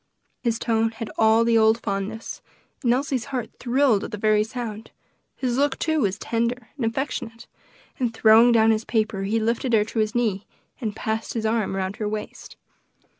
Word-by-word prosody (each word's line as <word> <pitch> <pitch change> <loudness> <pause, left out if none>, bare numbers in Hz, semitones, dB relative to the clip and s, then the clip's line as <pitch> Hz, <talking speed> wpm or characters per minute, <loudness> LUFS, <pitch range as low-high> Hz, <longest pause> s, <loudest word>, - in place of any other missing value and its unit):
His 235 -2 0
tone 225 -1 +1
had 225 -1 -6
all 220 +1 +4
the 230 -1 +4
old 220 +1 +4
fondness, 205 +1 -4 0.4
and 240 - +3
Elsie's 255 -1 0
heart 255 -4 -4
thrilled 245 -4 +2
at - - -5
the 210 - -5
very 215 0 +3
sound; 220 -1 -6 0.5
his 250 -2 -2
look, 280 -1 +1
too, 315 -1 0
was 195 -2 0
tender 235 +2 -2
and 275 - -4
affectionate, 230 -1 -4 0.5
and 245 -3 0
throwing 225 +1 +6
down 225 -1 +5
his 220 0 0
paper 220 -4 -1
he 210 +4 0
lifted 230 +3 -1
her 215 -2 +5
to 225 - -4
his 215 +1 0
knee, 210 -5 0 0.3
and 215 -5 -3
passed 220 +1 -3
his 225 -1 -2
arm 220 -3 0
around 190 +1 -3
her 210 -1 -2
waist. 215 0 -7
225 Hz, 180 wpm, -24 LUFS, 215-240 Hz, 0.5 s, throwing